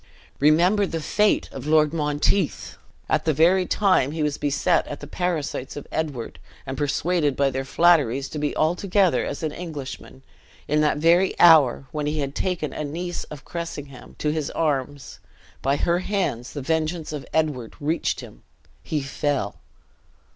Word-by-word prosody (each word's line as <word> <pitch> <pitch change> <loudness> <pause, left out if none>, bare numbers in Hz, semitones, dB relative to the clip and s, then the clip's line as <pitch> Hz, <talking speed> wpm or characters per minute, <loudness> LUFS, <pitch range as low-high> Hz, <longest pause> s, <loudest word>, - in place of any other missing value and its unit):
Remember 175 +8 +4
the 165 - -3
fate 210 +7 +1
of - - -7
Lord 155 0 +4
Monteith! 150 - 0 0.3
At - - 0
the 155 -3 +2
very 180 +4 +4
time 185 -9 +2
he 160 -1 -1
was 150 -1 -1
beset 145 +4 +1
by 145 - -4
the 145 - -10
parasites 155 -5 -3
of 145 - -7
Edward, 145 -7 -4 0.3
and 130 0 -4
persuaded 150 +1 0
by 140 -1 +2
their 135 +1 -2
flatteries 140 -4 +3
to 150 - -5
be 145 0 -1
altogether 180 +3 +2
as 145 - -5
an 155 - -1
Englishman, 145 -5 -8 0.4
in 150 +1 +2
that 150 -1 +2
very 170 +5 +3
hour, 155 -6 +6
when 150 -1 -2
he 150 +1 -1
had 140 -2 -2
taken 175 -4 -2
a - - -4
niece 175 +4 -4
of 145 -3 -11
Cressingham's 145 -6 -7
to 150 - 0
his 155 -2 -2
arms, 145 -3 -2 0.4
by 135 +1 +1
her 170 +4 +1
hands 180 - -2
the 145 - -5
vengeance 160 +1 -1
of 145 -2 -5
Edward 150 -7 -1
reached 155 +3 -1
him - - -13 0.4
he 150 -3 -2
fell!" 135 -5 -2
150 Hz, 160 wpm, -24 LUFS, 140-170 Hz, 0.4 s, hour